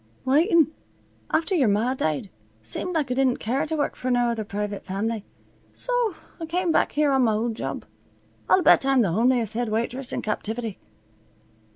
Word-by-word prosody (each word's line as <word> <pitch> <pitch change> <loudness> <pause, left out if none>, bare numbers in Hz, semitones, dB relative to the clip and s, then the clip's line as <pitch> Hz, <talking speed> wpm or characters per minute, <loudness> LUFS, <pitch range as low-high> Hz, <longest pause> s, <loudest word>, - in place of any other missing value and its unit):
"Waitin'. 315 +3 +4 0.6
After 325 +5 +1
yer 290 -10 +3
ma 215 +5 +2
died, 155 - -2 0.3
seemed 340 - -2
like 290 -5 0
I - - +3
didn't 260 -1 +2
care 265 +7 -1
t' 320 - -2
work 290 - -1
fer 255 - -4
no 245 -1 +2
other 230 -2 -2
privit 205 0 -4
fam'ly, 210 +3 -3 0.5
so - - -1 0.2
I 325 - -5
came 350 +1 0
back - - +2
here 295 -1 +2
on 265 -1 +3
my 220 - +2
old 225 +1 -1
job. - - -5 0.6
I'll 370 - +5
bet - - +6
I'm 270 -2 +3
the 190 - 0
homeliest 230 +2 +2
head 240 0 -1
waitress 235 +4 -1
in - - -3
captivity." 220 0 -3
245 Hz, 180 wpm, -24 LUFS, 220-300 Hz, 0.6 s, bet